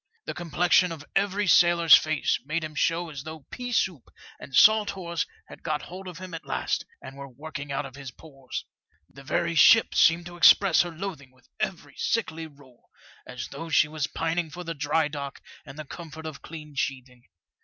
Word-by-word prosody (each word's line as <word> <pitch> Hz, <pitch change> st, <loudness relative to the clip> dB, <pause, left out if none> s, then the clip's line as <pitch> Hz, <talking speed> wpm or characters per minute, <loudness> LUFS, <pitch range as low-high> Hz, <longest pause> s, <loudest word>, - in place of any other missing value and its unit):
The 155 Hz, -, -4 dB
complexion 175 Hz, +2 st, +2 dB
of 155 Hz, -3 st, -8 dB
every 200 Hz, +1 st, +1 dB
sailor's 170 Hz, -2 st, +7 dB
face 155 Hz, -1 st, +1 dB
made 155 Hz, +4 st, -2 dB
him 155 Hz, 0 st, -6 dB
show 165 Hz, +2 st, 0 dB
as 140 Hz, -3 st, -7 dB
though 155 Hz, -1 st, -9 dB
pea 245 Hz, 0 st, -5 dB
soup 185 Hz, -, -1 dB, 0.3 s
and 135 Hz, -, -8 dB
salt 215 Hz, -1 st, +6 dB
horse 170 Hz, -4 st, -3 dB, 0.2 s
had -, -, -13 dB
got 155 Hz, -2 st, -2 dB
hold 185 Hz, +2 st, -9 dB
of 180 Hz, -2 st, -8 dB
him 185 Hz, -1 st, -9 dB
at 165 Hz, -, -6 dB
last, -, -, -2 dB, 0.2 s
and 135 Hz, -, -9 dB
were 140 Hz, 0 st, -9 dB
working 145 Hz, +2 st, -8 dB
out 140 Hz, +1 st, -2 dB
of 135 Hz, -, -10 dB
his 140 Hz, -2 st, -8 dB
pores. 135 Hz, 0 st, -9 dB, 0.4 s
The 135 Hz, -, -15 dB
very 170 Hz, +4 st, -1 dB
ship 225 Hz, +7 st, +6 dB
seemed 165 Hz, +1 st, +4 dB
to 175 Hz, 0 st, -9 dB
express 175 Hz, +1 st, +6 dB
her 175 Hz, -, -2 dB
loathing 165 Hz, -6 st, -7 dB
with 125 Hz, -2 st, -27 dB
every 185 Hz, -, -4 dB
sickly 165 Hz, -8 st, -2 dB
roll, 140 Hz, -5 st, -21 dB, 0.4 s
as 125 Hz, -1 st, -7 dB
though 150 Hz, +4 st, -7 dB
she 155 Hz, 0 st, +4 dB
was 155 Hz, -1 st, -3 dB
pining 165 Hz, 0 st, -2 dB
for 180 Hz, +4 st, -8 dB
the 165 Hz, -1 st, -4 dB
dry 150 Hz, +1 st, 0 dB
dock 140 Hz, -2 st, -6 dB, 0.3 s
and 135 Hz, +1 st, -10 dB
the 155 Hz, -, -7 dB
comfort 160 Hz, +1 st, -9 dB
of 155 Hz, -3 st, -7 dB
clean 155 Hz, -2 st, -10 dB
sheathing. 130 Hz, -2 st, -4 dB
160 Hz, 195 wpm, -26 LUFS, 140-175 Hz, 0.4 s, sailor's